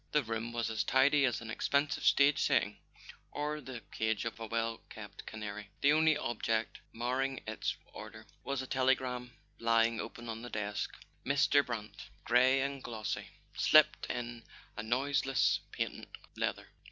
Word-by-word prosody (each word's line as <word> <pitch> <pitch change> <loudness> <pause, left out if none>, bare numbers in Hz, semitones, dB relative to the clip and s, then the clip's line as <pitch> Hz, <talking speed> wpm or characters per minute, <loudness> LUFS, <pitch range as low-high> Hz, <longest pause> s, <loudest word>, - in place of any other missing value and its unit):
The 150 - +4
room 115 +1 -3
was 115 -1 -1
as 110 - 0
tidy 140 +2 +4
as 125 - 0
an 115 -1 -6
expensive 140 +4 0
stage 140 0 +5
setting - - +2 0.5
or 150 +1 -2
the 125 -3 -8
cage 110 -1 -1
of 115 0 -4
a 115 - -5
well 115 0 -1
kept - - -10
canary: 105 -1 -6
the 145 +1 +5
only 155 0 +4
object 115 -1 -1
marring 130 +3 -1
its 110 0 -2 0.2
order - - -9 0.2
was 140 -1 -2
a - - -6
telegram 130 -2 0 0.3
lying 115 0 +3
open 120 0 -6
on 115 0 -5
the 120 - -7
desk. 105 -2 -3 0.3
Mr. 140 +1 +4
Brant, 110 -5 -6
grey 130 +3 +4
and 140 -1 -3
glossy, 110 -3 -4 0.3
slipped 155 0 +5
in 120 -1 -4 0.3
on 110 +1 -5
noiseless 135 +1 +2
patent - - -3 0.3
leather. - - -2
120 Hz, 155 wpm, -33 LUFS, 115-135 Hz, 0.5 s, stage